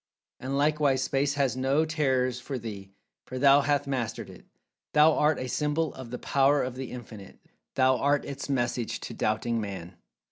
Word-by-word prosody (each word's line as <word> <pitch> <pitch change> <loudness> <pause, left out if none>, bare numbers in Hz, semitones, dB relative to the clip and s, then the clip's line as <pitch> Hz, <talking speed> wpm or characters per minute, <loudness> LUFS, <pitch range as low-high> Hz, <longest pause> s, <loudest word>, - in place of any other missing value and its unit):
And, 135 +2 -3
likewise, 145 -2 +2
Space 140 +2 0
has 135 -4 +1
no 135 +4 +1
terrors 130 -5 0
for 130 +2 -5
thee, 105 -4 -7 0.4
for 130 - -6
thou 140 +2 +6
hath 145 0 +1
mastered 130 -5 -3
it. - - -16 0.5
Thou 155 +1 +6
art 150 -1 +2
a 130 - -4
symbol 150 +4 -1
of 130 -3 -9
the 125 - -5
Power 140 +2 +2
of 125 - -3
The 130 0 -6
Infinite—thou 125 +3 -3
art 145 +2 +1
Its 140 0 -6
message 120 -3 -1
to - - -6
doubting 115 +2 -1
Man! 95 -4 -7
130 Hz, 170 wpm, -27 LUFS, 120-145 Hz, 0.5 s, thou